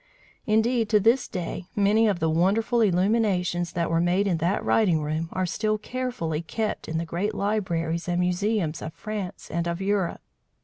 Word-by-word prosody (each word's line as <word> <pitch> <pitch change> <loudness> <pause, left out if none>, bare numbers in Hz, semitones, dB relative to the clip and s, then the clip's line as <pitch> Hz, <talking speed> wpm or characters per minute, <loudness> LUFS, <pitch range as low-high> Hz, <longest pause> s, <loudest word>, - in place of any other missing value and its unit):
Indeed, 225 +1 +2
to 215 - +5
this 230 +5 +3
day, 180 0 -5
many 210 +2 +4
of 200 -4 +1
the 160 - +1
wonderful 200 +9 +2
illuminations 185 -3 +1
that 170 -2 -1
were 165 0 +2
made 180 +3 +2
in 180 -4 +1
that 175 +5 0
writing 175 -9 +3
room 155 +2 -2
are 185 - -1
still 215 +4 0
carefully 215 -9 -3
kept 215 +6 -3
in 160 - -2
the 165 - -2
great 190 +6 -2
libraries 170 -6 -1
and 175 0 0
museums 180 -2 0
of 160 - -6
France 210 -4 -6
and 170 +1 -1
of 170 0 -2
Europe. 195 -2 -1
185 Hz, 175 wpm, -25 LUFS, 170-215 Hz, -, to